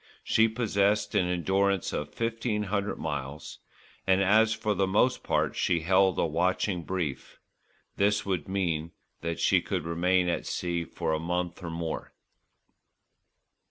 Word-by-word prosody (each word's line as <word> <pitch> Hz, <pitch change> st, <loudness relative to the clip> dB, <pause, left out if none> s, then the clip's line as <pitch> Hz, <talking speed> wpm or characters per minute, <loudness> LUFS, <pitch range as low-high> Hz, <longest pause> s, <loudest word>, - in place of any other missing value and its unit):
She 110 Hz, 0 st, +4 dB
possessed 105 Hz, -2 st, +1 dB
an 90 Hz, -, +2 dB
endurance 95 Hz, +2 st, +1 dB
of 75 Hz, 0 st, -3 dB
fifteen 115 Hz, -2 st, -1 dB
hundred 100 Hz, 0 st, -2 dB
miles, 75 Hz, -1 st, -5 dB, 0.5 s
and 95 Hz, 0 st, +4 dB
as 110 Hz, +3 st, +4 dB
for 110 Hz, -1 st, 0 dB
the 100 Hz, -1 st, +1 dB
most 125 Hz, +6 st, +2 dB
part -, -, 0 dB
she 85 Hz, -, +1 dB
held 95 Hz, +2 st, +3 dB
a -, -, +2 dB
watching 90 Hz, +3 st, 0 dB
brief, 85 Hz, -5 st, -4 dB, 0.6 s
this 105 Hz, +1 st, +2 dB
would 95 Hz, -3 st, -2 dB
mean 85 Hz, -4 st, -1 dB, 0.3 s
that 85 Hz, 0 st, -3 dB
she -, -, +3 dB
could -, -, -3 dB
remain 90 Hz, +2 st, +2 dB
at 85 Hz, -, -1 dB
sea 85 Hz, -1 st, -2 dB
for 80 Hz, -, -2 dB
a 80 Hz, -, 0 dB
month 90 Hz, +1 st, -2 dB
or 85 Hz, -, -5 dB
more. 80 Hz, -1 st, -4 dB
95 Hz, 145 wpm, -28 LUFS, 85-100 Hz, 0.6 s, She